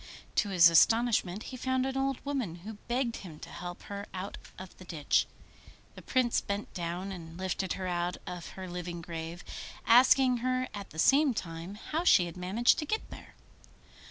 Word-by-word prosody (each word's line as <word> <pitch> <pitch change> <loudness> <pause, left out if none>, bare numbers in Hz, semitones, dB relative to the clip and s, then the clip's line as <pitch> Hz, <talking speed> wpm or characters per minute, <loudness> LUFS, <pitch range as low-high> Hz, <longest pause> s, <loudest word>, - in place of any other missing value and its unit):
To 205 - +3
his 175 -3 +7
astonishment 215 +2 +4
he - - -4
found 260 +1 0
an 265 0 -2
old 270 0 -1
woman, 260 -12 -2
who 220 - -5
begged 240 -1 0
him 165 -6 -10
to - - -8
help 175 0 -7
her 200 0 -6
out 185 +2 -5 0.2
of 185 -1 -10
the - - -10
ditch. 160 -5 +1 0.7
The - - -11
Prince 255 -3 +1
bent 200 +1 -4
down 175 +2 -4
and 165 -3 -8
lifted 190 0 -2
her 190 - -5
out 175 0 -1
of 180 -1 -6
her 190 0 -6
living 175 -1 -5
grave, 165 +2 -6 0.4
asking 250 +1 +6
her 255 +1 0
at 200 -1 -7
the 160 - -13
same 275 - +4
time 165 +1 -5
how 310 +10 -3
she 185 - +6
had 170 - -7
managed 190 +7 +2
to 300 - -2
get 435 +8 -2
there. - - -11
195 Hz, 185 wpm, -30 LUFS, 175-245 Hz, 0.7 s, his